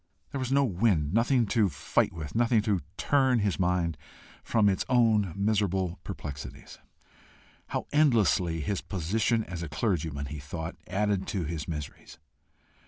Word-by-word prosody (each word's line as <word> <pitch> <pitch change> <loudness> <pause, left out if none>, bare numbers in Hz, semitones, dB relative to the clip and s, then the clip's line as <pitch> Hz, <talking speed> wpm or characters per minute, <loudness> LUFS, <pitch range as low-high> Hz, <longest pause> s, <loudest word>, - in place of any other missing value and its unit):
There 140 - -3
was 130 -1 -2
no 140 +1 +4
wind, 90 - +1
nothing 120 +2 +3
to 110 -4 +3
fight 70 - 0
with, 75 -3 -7
nothing 115 -1 +3
to 105 -4 +1 0.2
turn 135 -3 +3
his 100 -4 0
mind 90 -4 0 0.4
from 110 -3 +2
its 95 -2 +2
own 110 -7 +3
miserable 100 -3 0
perplexities. 70 -2 -8 0.9
How - - -3
endlessly 105 - +3
his 95 +6 -2
position 110 +6 0
as 90 -4 -6
a 85 - -5
clergyman, 75 -4 -1
he 75 +2 -6
thought, 80 +4 -6
added 100 0 0
to 100 -5 -2
his 80 -1 -4
miseries! 75 -3 -7
95 Hz, 145 wpm, -28 LUFS, 80-115 Hz, 0.9 s, no